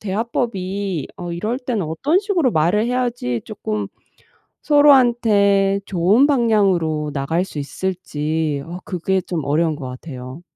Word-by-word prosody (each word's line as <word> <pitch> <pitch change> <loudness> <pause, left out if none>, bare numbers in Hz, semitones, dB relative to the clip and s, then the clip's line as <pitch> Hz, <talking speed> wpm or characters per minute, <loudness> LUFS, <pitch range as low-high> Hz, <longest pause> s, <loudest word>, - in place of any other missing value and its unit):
대화법이 200 - -2
어 175 -1 -6
이럴 215 +9 -2
때는 250 -6 -2
어떤 275 - +1
식으로 365 - +1
말을 175 +8 +2
해야지 240 - -1
쪼끔 105 -2 -4 0.8
서로한테 235 -9 +4
좋은 200 +9 +3
방향으로 195 - +1
나갈 160 +6 0
수 155 - -8
있을지 155 -2 -3
어 175 +2 -7
그게 190 +1 -1
좀 170 -4 -4
어려운 155 +2 +1
것 130 - -6
같아요. 130 +2 -9
190 Hz, 275 characters per minute, -20 LUFS, 155-230 Hz, 0.8 s, 서로한테